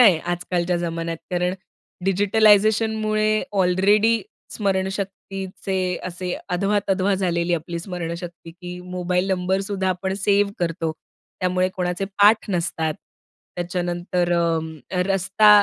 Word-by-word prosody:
आहे 195 -9 +7
आजकालच्या 175 0 -1
जमान्यात. 165 -1 -3
कारण 180 0 0 0.5
डिजिटलायझेशनमुळे 215 +2 +3
ऑलरेडी 200 +4 +3 0.3
स्मरणशक्तीचे 195 -1 -3 0.3
असे 180 0 -4 0.2
अधवा-तधवा 195 +1 +1
झालेली 175 -2 +1
आपली 170 +1 -4
स्मरणशक्ती 170 -1 -6
की 180 +1 -8
मोबाईल 180 +1 -1
नंबरसुद्धा 190 +1 0
आपण 190 +1 -1
सेव्ह 200 0 +2
करतो. 165 -2 -1 0.5
त्यामुळे 185 0 +2
कोणाचे 180 +1 -1 0.2
पाठ 210 0 +5
नसतात. 165 -3 -1 0.6
त्याच्यानंतर 175 0 -1
अ, 165 0 -1
रस्ता 195 +2 +3
185 Hz, 95 wpm, -23 LUFS, 175-195 Hz, 0.6 s, आहे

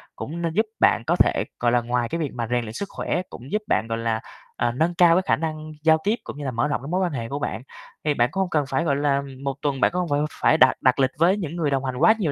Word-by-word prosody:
cũng 170 +4 -6
nên 165 -1 -1
giúp 220 +4 +2
bạn 115 - +4
có - - +3
thể - - +3 0.2
gọi 120 0 +2
là 120 - +3
ngoài 120 0 -1
cái 165 - -3
việc 150 -4 -2
mà 120 -2 -3
rèn 125 - +2
luyện 110 -1 -7
sức 200 +9 -5
khỏe, 180 - -2
cũng 125 +3 -11
giúp 210 - 0
bạn, 115 - +1
gọi 115 - -2
là, 115 -1 -1 0.4
ờ, 120 - 0
nâng 160 +8 0
cao 170 -1 +6
cái 185 - +3
khả - - +3
năng 155 -1 -5
giao 160 0 +5
tiếp 215 +3 +2
cũng - - -8
như 145 - -6
là 130 - -1
mở 120 +4 0
rộng 145 - -2
cái 135 - -8
mối 185 +3 0
quan 180 - 0
hệ 115 -5 -4
của 140 - -3
bạn. 115 - -3 0.4
Thì 150 - +2
bạn 120 -3 +2
cũng 195 - -1
hông 185 - -1
cần 150 -4 +1
phải, 135 +5 0
gọi 145 -4 +1
là, 140 -1 +1
ừm, 135 -1 -7
1 140 -1 -2
tuần 140 -3 -1
bạn - - +4
cũng 180 - -2
hông 175 - -2
phải 145 0 +1 0.2
phải - - +4
đặt - - +6
đặt 130 +1 +3
lịch 130 0 +3
với 175 +5 +4
những 170 -5 -4
người 160 -4 0
đồng 135 -1 0
hành 130 -1 -3
quá 170 +11 +6
nhiều 165 -7 0
145 Hz, 320 wpm, -23 LUFS, 125-170 Hz, 0.4 s, cao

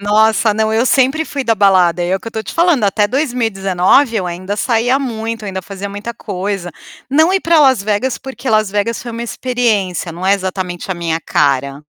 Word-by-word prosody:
Nossa! 215 +2 +3
Não, 220 0 0
eu 225 +3 +2
sempre 270 +5 +2
fui 280 -3 -4
da 230 - +2
balada, 185 -4 +3
é 180 +2 0
o - - -8
que - - -16
eu - - -1
estou 220 -1 -4
te 210 - -7
falando, 335 -8 +2
até 205 +1 +2
2019 225 - +1
eu 190 -4 -1
ainda 185 +4 -4
saía 240 +3 +1
muito, 225 -4 -4
ainda 190 -2 -4
fazia 200 +1 -7
muita 205 +4 -6
coisa. 195 -3 -4 0.4
Não 315 +6 +4
ir 385 - +2
para 330 -3 +3
Las 265 -7 +4
Vegas 215 +5 -1
porque 265 -1 -7
Las 215 -2 +2
Vegas 210 +3 -1
foi 240 - -7
uma 230 +1 -5
experiência, 225 -8 -1
não 175 +3 -5
é 195 - +5
exatamente 185 -2 -4
a - - 0
minha 165 -1 -2
cara. 140 0 0
215 Hz, 205 wpm, -16 LUFS, 190-245 Hz, 0.4 s, é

